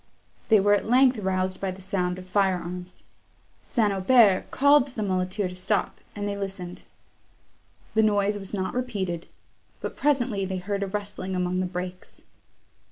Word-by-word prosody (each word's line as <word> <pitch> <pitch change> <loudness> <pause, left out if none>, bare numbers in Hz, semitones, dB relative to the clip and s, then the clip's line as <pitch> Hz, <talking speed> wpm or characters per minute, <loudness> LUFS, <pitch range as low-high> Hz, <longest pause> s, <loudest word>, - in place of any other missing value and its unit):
They 220 -2 +7
were 205 +1 +4
at 205 - 0
length 255 -1 +5
roused 185 -1 -1
by 195 - -1
the 185 +1 -7
sound 180 -1 -1
of 185 - -9
fire 190 0 +2
arms. 180 +1 -8 0.6
St. 210 -4 +1
Aubert 195 0 +4
called 285 0 +5
to 255 - -10
the 215 - -2
muleteer 185 +1 -1
to 180 - -8
stop, 185 +2 -1 0.2
and 205 0 -3
they 200 - -2
listened. 195 -3 -6 1.1
The 220 - +4
noise 205 -1 +2
was 195 -2 -6
not 190 -2 -2
repeated; 200 -9 -3 0.5
but - - -5
presently 250 -8 +1
they 190 0 -2
heard 200 +2 -3
a 200 - -1
rustling 205 -1 -4
among 180 0 0
the 185 - 0
brakes. 180 0 -7
195 Hz, 165 wpm, -26 LUFS, 185-210 Hz, 1.1 s, They